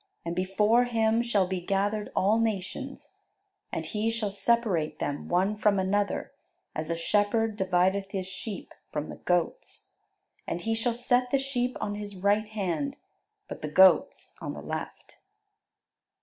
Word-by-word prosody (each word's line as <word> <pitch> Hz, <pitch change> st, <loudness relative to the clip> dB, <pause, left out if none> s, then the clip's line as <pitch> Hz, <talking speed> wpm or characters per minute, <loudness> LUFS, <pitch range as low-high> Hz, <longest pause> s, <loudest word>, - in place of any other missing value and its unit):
And 170 Hz, 0 st, -2 dB
before 210 Hz, +6 st, +3 dB
Him 225 Hz, -1 st, +2 dB
shall 215 Hz, -5 st, +2 dB
be 185 Hz, 0 st, -3 dB
gathered 205 Hz, +3 st, -1 dB
all 210 Hz, +4 st, +3 dB
nations; 210 Hz, -5 st, -3 dB, 0.6 s
and -, -, -3 dB
He 215 Hz, +1 st, -1 dB
shall 225 Hz, -3 st, -1 dB
separate 200 Hz, -8 st, +1 dB
them 145 Hz, -1 st, -3 dB
one 190 Hz, +4 st, +2 dB
from 210 Hz, -1 st, +3 dB
another, 200 Hz, +2 st, 0 dB, 0.4 s
as 155 Hz, +1 st, -4 dB
a 170 Hz, -, -1 dB
shepherd 210 Hz, +5 st, +1 dB
divideth 190 Hz, 0 st, +1 dB
his 195 Hz, -2 st, -3 dB
sheep 190 Hz, +2 st, -7 dB, 0.2 s
from 150 Hz, 0 st, -3 dB
the -, -, -7 dB
goats. 175 Hz, -2 st, -2 dB, 0.6 s
And 175 Hz, -, -2 dB
He 225 Hz, +3 st, 0 dB
shall 230 Hz, +1 st, 0 dB
set 245 Hz, +1 st, +2 dB
the 275 Hz, -, +3 dB
sheep 255 Hz, -2 st, -1 dB
on 205 Hz, -, -2 dB
His 205 Hz, -1 st, -6 dB
right 205 Hz, +3 st, +2 dB
hand, 215 Hz, -, -2 dB, 0.5 s
but -, -, -7 dB
the 150 Hz, -, -3 dB
goats 190 Hz, +4 st, +4 dB
on -, -, -4 dB
the -, -, -7 dB
left." -, -, -6 dB
205 Hz, 150 wpm, -28 LUFS, 185-225 Hz, 0.6 s, goats